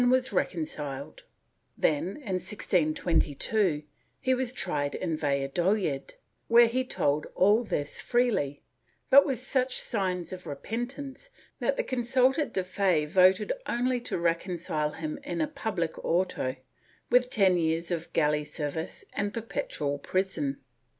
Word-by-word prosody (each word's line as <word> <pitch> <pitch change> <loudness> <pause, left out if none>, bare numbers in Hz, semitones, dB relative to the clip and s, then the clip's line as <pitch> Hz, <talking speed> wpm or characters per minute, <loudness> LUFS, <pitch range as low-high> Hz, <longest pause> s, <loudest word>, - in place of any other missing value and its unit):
456 245 -10 +1
PROTESTANTISM 140 0 -6
[Book - - -19 0.5
VIII 160 +5 +1 2.3
tried 175 - -1
in 170 -3 -2
Valladolid, 145 +2 0 0.3
where 235 +1 +7
he 250 +3 0
told 150 - 0
all 210 +5 +4
this 145 -9 -2
freely, 235 - +1 0.5
but 280 +2 +8
with 265 -3 0
such 255 +1 0
signs 185 -5 -1
of 180 -1 -8
repentance 245 - -5 0.3
that - - 0
the - - +1
consulta 260 - +2
de 190 - -1
fe 185 -4 +1
voted 185 - +4
only 245 +1 0
to - - -3
reconcile 170 -3 -1
him 155 -1 -5
in 175 -1 -4
a 155 - +1
public 175 -7 -3
auto, 165 -7 0 0.6
with 250 0 +4
ten 190 -6 +4
years 165 +1 0
of 170 -1 -3
galley 150 -1 +2
service 150 +2 -4
and 205 0 -1
per 230 - -2
petual 145 -10 -3
prison. 165 -8 -1
180 Hz, 125 wpm, -28 LUFS, 150-240 Hz, 2.3 s, but